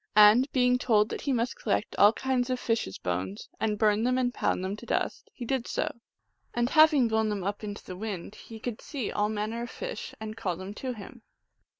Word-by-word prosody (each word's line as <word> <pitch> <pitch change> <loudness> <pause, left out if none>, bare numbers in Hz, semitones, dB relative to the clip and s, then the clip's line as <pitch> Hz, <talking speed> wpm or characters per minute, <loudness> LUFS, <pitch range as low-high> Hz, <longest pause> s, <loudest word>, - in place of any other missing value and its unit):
And 215 +6 +7
being 250 -1 +3
told 215 -3 +3
that - - -4
he 280 - -1
must 245 -1 0
collect 210 -1 -1
all 205 - +8
kinds 255 +1 -1
of 255 -1 0
fishes 225 - -1
bones, 90 +3 -3
and 215 -1 0
burn 210 +1 +3
them 250 +1 +2
and 245 -1 +1
pound 185 - 0
them 195 +2 -2
to 235 - -11
dust, - - -2
he 245 - -7
did 255 0 -1
so; - - -1 0.6
and, 240 +1 +1
having 310 -5 +6
blown 220 -1 +1
them 205 -3 -2
up 205 +3 -3
into 205 -1 -6
the 185 - -7
wind, 200 -1 -5
he 220 +1 -11
could 230 0 -5
see 265 -7 -4
all 210 0 +1
manner 215 +2 -2
of 240 - -5
fish 485 -1 -6
and 220 0 -6
call 195 -6 -2
them 190 +2 -7
to 255 +3 -4
him. 230 +2 -11
220 Hz, 220 wpm, -28 LUFS, 210-250 Hz, 0.6 s, all